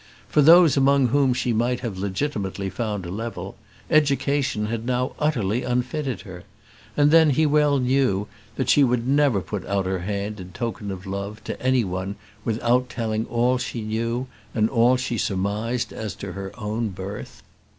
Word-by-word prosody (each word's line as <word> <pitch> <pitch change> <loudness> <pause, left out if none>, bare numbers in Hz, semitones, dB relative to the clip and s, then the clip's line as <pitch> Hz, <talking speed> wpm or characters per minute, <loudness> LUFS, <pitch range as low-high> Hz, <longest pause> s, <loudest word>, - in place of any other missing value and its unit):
For 150 - +3
those 165 -1 +7
among 135 -2 +4
whom 140 +1 +3
she 125 -1 0
might 120 +2 0
have 115 -6 -4
legitimately 100 -2 -2
found 105 -5 -3
a 85 - -6
level, 115 +4 -5 0.3
education 140 -6 +2
had 110 +1 -3
now 125 +1 -1
utterly 125 -7 0
unfitted 125 +2 -2
her. 90 -4 -10 0.5
And 145 0 +5
then, 160 -1 +6
he 155 +3 +3
well 150 -1 +3
knew 125 -6 +1 0.3
that 130 - -2
she 145 +3 +5
would 125 -2 +1
never 140 -7 +3
put 100 0 -5
out 100 -1 0
her 95 0 -1
hand 100 +3 -3
in 90 0 -9
token 115 -3 -4
of 95 0 -6
love 100 +2 -5
to - - -6
any 130 -1 +3
one 95 +1 -4 0.3
without 120 +3 +1
telling 110 -2 -2
all 125 +2 +1
she 115 -2 -4
knew 115 +3 -2 0.3
and 110 -1 +2
all 125 +1 +4
she 125 -3 -2
surmised 105 +6 -1
as 110 -2 -5
to 100 - -7
her 95 +1 -6
own 110 +1 -2
birth. 95 +2 -8
115 Hz, 170 wpm, -24 LUFS, 100-130 Hz, 0.5 s, those